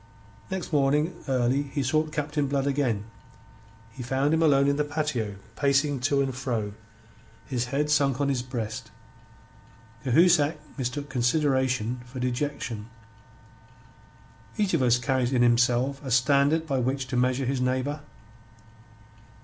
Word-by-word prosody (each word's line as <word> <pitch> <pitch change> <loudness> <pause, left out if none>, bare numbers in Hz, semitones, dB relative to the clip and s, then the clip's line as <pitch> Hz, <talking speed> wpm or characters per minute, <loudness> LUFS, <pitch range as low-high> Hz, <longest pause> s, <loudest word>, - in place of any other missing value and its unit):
Next 190 -3 -4
morning 150 +4 +2
early 130 +1 +1
he 140 0 -3
sought 155 +4 +1
Captain 150 -1 -1
Blood 135 0 0
again. 135 -7 0 0.9
He 130 +2 -10
found 135 +4 0
him 160 - +2
alone 140 -3 +4
in 140 0 +2
the 150 - +2
patio, 145 -8 -2 0.2
pacing 140 +1 +2
to 140 +2 +2
and 135 -1 -2
fro, 120 -5 -3 0.7
his 125 -2 -2
head 145 +4 -1
sunk 140 -3 +2
on 140 - +1
his 135 -3 0
breast. 115 -2 -5 1.1
Cahusac 155 +2 +4 0.2
mistook 135 +2 -3
consideration 130 -3 0
for 125 +1 -9
dejection. 125 -3 -3 1.7
Each 205 -3 +1
of 165 - +2
us 120 -1 +4
carries 130 0 0
in 125 -1 +3
himself 125 +3 +2
a 135 - -5
standard 140 +5 +3
by 135 -4 -1
which 130 +2 -1
to 125 - -3
measure 125 +2 +1
his 130 0 -1
neighbour. 130 +3 -1
135 Hz, 135 wpm, -26 LUFS, 125-145 Hz, 1.7 s, alone